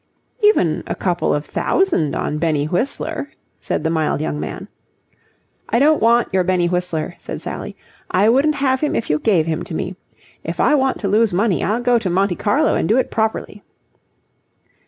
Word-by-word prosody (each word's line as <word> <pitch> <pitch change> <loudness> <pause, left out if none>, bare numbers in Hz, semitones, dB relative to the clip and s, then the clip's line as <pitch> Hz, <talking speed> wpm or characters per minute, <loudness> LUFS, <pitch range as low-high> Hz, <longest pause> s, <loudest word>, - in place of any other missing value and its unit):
"Even 415 - +3
a - - -2
couple 175 -2 0
of 145 0 -1
thousand 180 - 0
on 150 - -2
Benny 155 -3 0
Whistler..." 280 - -2 0.3
said - - -3
the 160 - 0
mild 160 -3 0
young 150 -1 -3
man. - - -6 1.0
"I - - +2
don't 300 +4 +4
want 235 -1 +3
your 190 -1 +3
Benny 180 -1 +1
Whistler," 180 -3 -2
said - - -6
Sally. - - -6 0.3
"I 195 +3 +3
wouldn't 275 +6 +3
have 265 -2 +1
him 300 - -1
if 230 - -1
you 150 - +1
gave 175 -6 +2
him 160 0 -2
to 160 - -6
me. 185 +3 -3 0.5
If - - -5
I - - +4
want 265 -2 +2
to 200 - -1
lose 215 0 +2
money, 195 0 +1
I'll 225 +4 0
go 245 -1 +3
to 205 -5 -2
Monte 190 +1 +1
Carlo 270 +9 +2
and - - 0
do 225 - +4
it 260 - 0
properly." 220 -2 -2
200 Hz, 185 wpm, -19 LUFS, 170-250 Hz, 1.0 s, don't